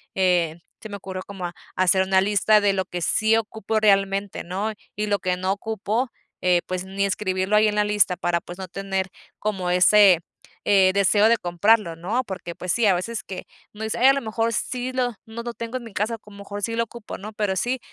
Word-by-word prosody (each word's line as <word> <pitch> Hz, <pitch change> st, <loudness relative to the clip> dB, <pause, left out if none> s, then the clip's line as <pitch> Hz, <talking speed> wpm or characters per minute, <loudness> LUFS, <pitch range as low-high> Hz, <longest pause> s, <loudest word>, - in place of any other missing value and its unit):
eh, 175 Hz, -4 st, +2 dB, 0.2 s
se 220 Hz, -, -8 dB
me 205 Hz, -, -5 dB
ocurrió 185 Hz, -1 st, -7 dB
como 195 Hz, -3 st, -6 dB
ha 175 Hz, -, -5 dB, 0.2 s
hacer 185 Hz, +1 st, +4 dB
una 190 Hz, 0 st, +3 dB
lista 210 Hz, +2 st, +4 dB
de 205 Hz, -1 st, +2 dB
lo 190 Hz, -1 st, 0 dB
que 175 Hz, -1 st, -6 dB
sí 220 Hz, +6 st, +3 dB
ocupo 220 Hz, 0 st, -2 dB
realmente, 195 Hz, -1 st, +1 dB
¿no? 195 Hz, +5 st, -3 dB, 0.2 s
Y 210 Hz, 0 st, -1 dB
lo 205 Hz, -1 st, +1 dB
que 180 Hz, -1 st, -1 dB
no 185 Hz, +1 st, 0 dB
ocupo, 220 Hz, +4 st, -2 dB, 0.3 s
eh, 180 Hz, -1 st, +4 dB
pues, 185 Hz, 0 st, -3 dB
ni 195 Hz, +1 st, -1 dB
escribirlo 190 Hz, 0 st, 0 dB
ahí 215 Hz, 0 st, +5 dB
en 210 Hz, -, -3 dB
la 210 Hz, 0 st, +2 dB
lista 205 Hz, -3 st, +3 dB
para, 175 Hz, -1 st, 0 dB
pues, 175 Hz, +2 st, -10 dB
no 190 Hz, -, -6 dB
tener 195 Hz, +1 st, -3 dB, 0.3 s
como 190 Hz, -4 st, -2 dB
ese, 185 Hz, 0 st, +6 dB, 0.5 s
eh, 190 Hz, -2 st, +5 dB
deseo 205 Hz, +2 st, +4 dB
de 235 Hz, -, +4 dB
comprarlo, 175 Hz, 0 st, +2 dB
¿no? 210 Hz, +10 st, -1 dB
Porque, 185 Hz, -4 st, -6 dB
pues 180 Hz, +1 st, -2 dB
sí, 235 Hz, -2 st, +2 dB
a 195 Hz, -, +5 dB
veces 215 Hz, +4 st, -3 dB
que 185 Hz, -2 st, -7 dB, 0.3 s
uno 215 Hz, +1 st, -7 dB
dice 220 Hz, -, -2 dB
a 265 Hz, +2 st, +7 dB
lo 275 Hz, -, -1 dB
mejor 225 Hz, +1 st, -1 dB
sí 250 Hz, +3 st, -2 dB
lo 250 Hz, -2 st, -1 dB
no 230 Hz, +1 st, -7 dB
lo 240 Hz, 0 st, -5 dB
tengo 230 Hz, +2 st, -5 dB
en 250 Hz, -, -8 dB
mi 225 Hz, -, -11 dB
casa, 220 Hz, +4 st, -1 dB
como 210 Hz, -2 st, -16 dB
a -, -, -13 dB
lo -, -, -8 dB
mejor 205 Hz, +1 st, -6 dB
sí 230 Hz, +2 st, -1 dB
lo 230 Hz, -, +1 dB
ocupo, 230 Hz, -1 st, -9 dB
¿no? 210 Hz, +3 st, -8 dB
Pero 205 Hz, -3 st, -1 dB
sí, 245 Hz, +7 st, -1 dB
200 Hz, 230 wpm, -23 LUFS, 185-220 Hz, 0.5 s, a